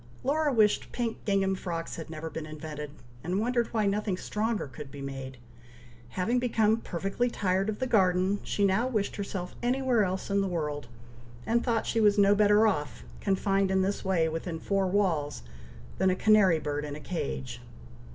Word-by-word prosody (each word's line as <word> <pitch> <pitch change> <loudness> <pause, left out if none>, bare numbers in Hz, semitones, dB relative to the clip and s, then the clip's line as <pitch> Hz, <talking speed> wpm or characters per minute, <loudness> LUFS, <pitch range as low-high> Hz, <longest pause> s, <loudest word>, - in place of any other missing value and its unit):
Laura 295 +2 +1
wished 215 -4 +2
pink 235 -2 -3
gingham 195 -1 +2
frocks 170 -3 -4
had 160 - -7
never 160 0 -6
been 160 -1 -6
invented, 150 -1 -7 0.3
and 180 +4 -1
wondered 240 +1 +1
why 220 -2 0
nothing 200 -1 0
stronger 220 +3 -2
could 140 +1 -9
be 140 - -10
made! 135 -1 -6 0.8
Having 230 +7 +1
become 225 -3 +2
perfectly 195 +4 -2
tired 195 -2 0
of 215 - -3
the 260 - -1
garden, 190 -3 +2
she 200 - 0
now 200 +6 +2
wished 215 -6 -1
herself 195 -3 -4
anywhere 250 -2 +2
else 190 +1 -3
in 200 0 +3
the 195 - 0
world, 150 -6 -3 0.6
and 235 +1 +1
thought 230 -3 0
she 225 - 0
was 210 -1 +4
no 200 0 +6
better 210 +1 +5
off, 150 -9 -1 0.2
confined 195 0 +1
in 190 0 +2
this 200 +2 -2
way 180 -4 +2
within 165 +1 -4
four 195 +2 0
walls, 170 - 0 0.6
than 190 0 +4
a 185 - +2
canary 200 -4 +5
bird 150 -1 -3
in 145 -1 -5
a - - -7
cage. 65 - -4
195 Hz, 180 wpm, -29 LUFS, 160-215 Hz, 0.8 s, no